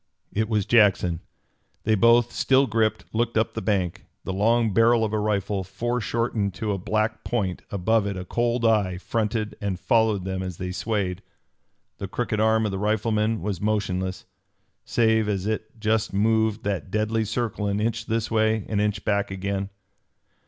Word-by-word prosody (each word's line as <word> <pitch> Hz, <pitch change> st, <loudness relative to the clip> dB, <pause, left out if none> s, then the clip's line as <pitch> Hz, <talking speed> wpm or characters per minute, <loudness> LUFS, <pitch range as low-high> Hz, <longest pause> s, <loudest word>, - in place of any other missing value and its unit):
It 110 Hz, +1 st, 0 dB
was 105 Hz, -3 st, +1 dB
Jackson. 95 Hz, -7 st, +3 dB, 0.6 s
They 110 Hz, -, +2 dB
both, 115 Hz, +3 st, +4 dB
still 135 Hz, +1 st, +3 dB
gripped, 110 Hz, -2 st, 0 dB
looked 115 Hz, 0 st, 0 dB
up 110 Hz, -, +1 dB
the 110 Hz, -, -4 dB
bank. 95 Hz, -6 st, -1 dB, 0.2 s
The 95 Hz, -, -3 dB
long 110 Hz, +2 st, +2 dB
barrel 115 Hz, +1 st, +4 dB
of 110 Hz, -, -4 dB
a 110 Hz, -, +1 dB
rifle, 100 Hz, -2 st, -1 dB
foreshortened 110 Hz, 0 st, -2 dB
to 110 Hz, +2 st, -2 dB
a 100 Hz, -, -2 dB
black 110 Hz, +3 st, -1 dB
point, 100 Hz, -7 st, -2 dB
above 100 Hz, +2 st, +1 dB
it 100 Hz, -2 st, -3 dB
a 90 Hz, -, -6 dB
cold 120 Hz, +3 st, 0 dB
eye, 105 Hz, -5 st, +2 dB
fronted 110 Hz, +2 st, -2 dB
and 100 Hz, -3 st, -2 dB
followed 110 Hz, -5 st, +2 dB
them 95 Hz, 0 st, -3 dB
as 90 Hz, -2 st, -5 dB
they 90 Hz, 0 st, -4 dB
swayed. 95 Hz, -2 st, -2 dB, 0.8 s
The 100 Hz, -, -4 dB
crooked 110 Hz, +2 st, -2 dB
arm 110 Hz, 0 st, +3 dB
of 105 Hz, -, -1 dB
the 95 Hz, -, -3 dB
rifleman 110 Hz, -1 st, 0 dB
was 100 Hz, -3 st, -3 dB
motionless, 95 Hz, -3 st, -1 dB, 0.6 s
save 110 Hz, -2 st, +2 dB
as 100 Hz, -2 st, -1 dB
it 110 Hz, +1 st, -4 dB
just 110 Hz, 0 st, 0 dB
moved 110 Hz, +1 st, +1 dB
that 100 Hz, -5 st, -2 dB
deadly 110 Hz, +2 st, 0 dB
circle 110 Hz, -1 st, -2 dB
an 100 Hz, 0 st, 0 dB
inch 115 Hz, +1 st, -1 dB
this 110 Hz, 0 st, -1 dB
way, 110 Hz, -1 st, +2 dB
an 105 Hz, -, 0 dB
inch 105 Hz, -1 st, -1 dB
back 100 Hz, -1 st, +1 dB
again. 100 Hz, +1 st, -3 dB
110 Hz, 170 wpm, -25 LUFS, 100-110 Hz, 0.8 s, both